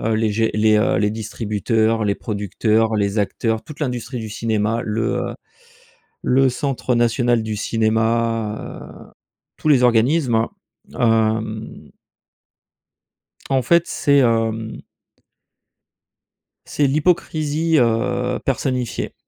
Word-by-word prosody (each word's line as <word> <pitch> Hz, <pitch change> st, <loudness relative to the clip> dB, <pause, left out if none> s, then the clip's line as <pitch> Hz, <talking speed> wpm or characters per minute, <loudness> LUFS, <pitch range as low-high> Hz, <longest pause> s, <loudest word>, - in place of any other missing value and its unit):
les 110 Hz, 0 st, +1 dB
gé 110 Hz, +1 st, +1 dB
les 110 Hz, 0 st, +3 dB
heu, 105 Hz, -, +2 dB
les 105 Hz, +2 st, +2 dB
distributeurs, 110 Hz, +1 st, -1 dB
les 100 Hz, -1 st, 0 dB
producteurs, 110 Hz, +1 st, 0 dB
les 100 Hz, 0 st, 0 dB
acteurs, 110 Hz, +2 st, -1 dB
toute 150 Hz, -, -11 dB
l'industrie 125 Hz, -3 st, -3 dB
du 110 Hz, -1 st, -6 dB
cinéma, 110 Hz, +1 st, -1 dB
le 110 Hz, +1 st, -2 dB, 0.3 s
heu, -, -, -6 dB, 0.9 s
le 135 Hz, +1 st, +3 dB
Centre 130 Hz, -2 st, -2 dB
National 120 Hz, 0 st, +2 dB
du 110 Hz, -1 st, -3 dB
Cinéma, 115 Hz, 0 st, -1 dB, 0.2 s
heu, -, -, -24 dB, 0.5 s
tous 155 Hz, -, -1 dB
les 135 Hz, -4 st, +5 dB
organismes, 120 Hz, 0 st, +3 dB, 0.5 s
hem. 110 Hz, -1 st, 0 dB, 1.6 s
En 135 Hz, -1 st, +2 dB
fait, 170 Hz, +7 st, +3 dB
c'est, 140 Hz, 0 st, +2 dB
hem 115 Hz, -3 st, 0 dB, 1.9 s
c'est 145 Hz, -, 0 dB
l'hypocrisie, 155 Hz, +1 st, +1 dB
heu, 125 Hz, +1 st, +1 dB
personnifiée 130 Hz, -2 st, -2 dB
115 Hz, 105 wpm, -20 LUFS, 110-125 Hz, 1.9 s, les